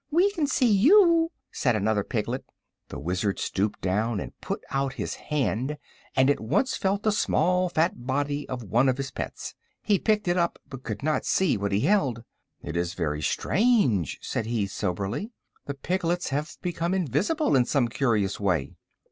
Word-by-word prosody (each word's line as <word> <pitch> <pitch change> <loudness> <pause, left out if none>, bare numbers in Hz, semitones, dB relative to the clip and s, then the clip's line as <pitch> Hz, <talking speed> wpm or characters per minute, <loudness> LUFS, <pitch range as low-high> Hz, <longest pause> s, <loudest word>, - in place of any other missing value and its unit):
"We 355 +6 +3
can 320 -7 -1
see 270 - +2
you," 330 - +5 0.2
said 125 -4 +1
another 110 0 +1
of - - -10
the - - -35
piglets. - - -2 0.4
The - - -7
Wizard 95 +5 -1
stooped 100 +2 -2
down 105 +4 0
and - - -6
put - - -4
out 135 0 0
his - - -4
hand, 140 0 -2 0.4
and 130 0 +4
at 145 - +2
once 190 - 0
felt 195 +2 0
the 215 - +3
small 180 -3 +2
fat 160 -7 0
body 145 +2 -1
of 125 -2 -4
one 120 +6 +2
of 130 - 0
his 135 -1 -4
pets. - - -6 0.3
He 205 -3 +2
picked 215 -3 +1
it 175 +1 +2
up, 170 -1 +1
but 135 -2 -9
could 105 -1 -5
not 155 0 +1
see 190 - +2
what 100 -1 -2
he 100 +2 +1
held. 135 - +1 0.4
"It 80 - -5
is 85 0 -1
very 75 -3 -2
strange," 190 - +2
said 110 - -2
he, 115 -3 0
soberly. 100 - -3 0.3
"The 140 - -3
piglets 175 +3 -1
have 145 +4 -3
become 175 0 -1
invisible, 185 - +1
in 125 -2 +4
some 130 -2 +1
curious 115 -6 0
way." 90 -9 -1
135 Hz, 180 wpm, -26 LUFS, -, 0.4 s, you